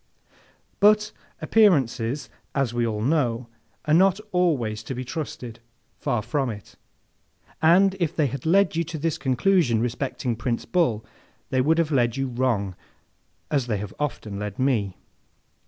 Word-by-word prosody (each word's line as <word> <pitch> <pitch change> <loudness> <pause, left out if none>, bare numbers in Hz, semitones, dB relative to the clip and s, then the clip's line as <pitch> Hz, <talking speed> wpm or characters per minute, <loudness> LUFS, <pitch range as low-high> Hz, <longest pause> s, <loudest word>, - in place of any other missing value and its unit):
But, 210 +1 +4 0.3
appearances, 140 - +2 0.3
as 135 -4 0
we 120 -1 0
all 105 -1 -2
know, 125 -4 +1 0.4
are 150 - +2
not 190 +3 +4
always 135 -13 +1
to 120 +4 -6
be 130 +1 -5
trusted—far 120 -3 -5
from 140 -1 -1
it; 105 -5 -9 0.9
and 185 +4 +5
if 170 -4 -1
they 155 - +2
had 135 -1 -4
led 190 +1 +3
you 170 - +1
to 165 0 -6
this 160 +1 -2
conclusion 135 - +2
respecting 125 +1 -2
Prince 115 +1 -2
Bull, 155 - +1 0.5
they 130 - +2
would 160 +5 +2
have 165 -2 +1
led 120 -3 +2
you 135 -1 -1
wrong 120 -7 -1 0.8
as 140 -5 +1
they 105 -4 -1 0.2
often 120 -7 -3
have 100 - -5
led 105 -1 -5
me. 115 -8 0
130 Hz, 145 wpm, -24 LUFS, 115-160 Hz, 0.9 s, and